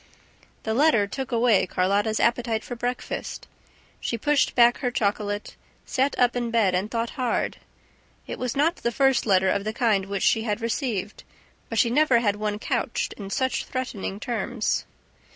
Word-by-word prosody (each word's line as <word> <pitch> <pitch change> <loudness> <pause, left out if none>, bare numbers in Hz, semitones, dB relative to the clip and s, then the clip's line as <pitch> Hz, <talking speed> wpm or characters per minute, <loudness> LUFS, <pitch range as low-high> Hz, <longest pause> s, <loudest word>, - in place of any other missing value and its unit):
The 220 - -1
letter 250 -5 +4
took 265 +6 -5
away 230 -5 +3
Carlotta's 200 +5 +1
appetite 235 -2 +1
for 245 - -6
breakfast. 245 +1 -4 0.5
She 235 - -2
pushed 290 +4 +1
back 240 0 +5
her 250 - 0
chocolate, 205 -2 -2 0.3
sat 270 +2 0
up 245 -1 +3
in 240 -1 -1
bed 225 -5 +2
and 190 +4 0
thought 230 0 -2
hard. 245 -2 0 0.7
It - - -6
was 250 +1 -3
not 325 +5 +2
the 235 - -1
first 270 -1 +2
letter 190 -1 +4
of 200 +1 0
the 215 +1 -3
kind 215 -5 +1
which 200 -1 -2
she 225 - +3
had 215 -2 -2
received, 230 -4 -3 0.5
but 225 - -3
she 230 +1 +3
never 285 -2 +4
had 205 -3 +1
one 210 0 -2
couched - - -2
in 200 -2 -8
such 260 +4 -1
threatening 220 -6 -4
terms. 235 -1 -2
230 Hz, 170 wpm, -25 LUFS, 205-245 Hz, 0.7 s, back